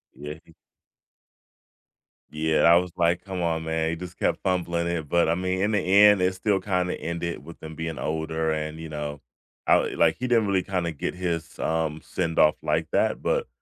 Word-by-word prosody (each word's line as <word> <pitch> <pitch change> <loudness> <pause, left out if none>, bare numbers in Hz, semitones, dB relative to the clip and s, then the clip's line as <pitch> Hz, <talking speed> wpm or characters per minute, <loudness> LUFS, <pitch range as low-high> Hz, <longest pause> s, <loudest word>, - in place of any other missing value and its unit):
Yeah, 75 +1 -7
he 80 - -19 1.8
Yeah, 80 +1 +1
I 85 0 +7
was, 90 0 +1
like, 85 +1 +1
"Come 95 -2 -5
on, 80 -1 0
man," 80 0 -1
he 85 - -2
just 90 +1 -9
kept - - 0
fumbling 85 -2 0
it, 80 -4 -3
but 85 -2 +3
I 80 - +3
mean, 95 +1 -1
in 105 +2 +1
the 105 - +2
end, 100 +1 +6
it 95 0 +1
still 95 +1 +1
kinda 90 -2 -1
ended 85 -2 -4
with 85 +2 -12
them 80 0 -9
being 80 -1 -4
older 80 0 -1
and, 80 +1 -3
you 80 - -7
know 75 -1 -5 0.5
I - - +6 0.2
like, - - +3
he 125 - -3
didn't 115 -3 +3
really 95 -2 +1
kinda 90 -4 -2
get 70 - -4
his, 85 -3 -4
um, 80 -1 -1
send 80 -1 -2
off 75 - +5
like - - 0
that, - - +1
but - - 0
85 Hz, 200 wpm, -25 LUFS, 80-90 Hz, 1.8 s, I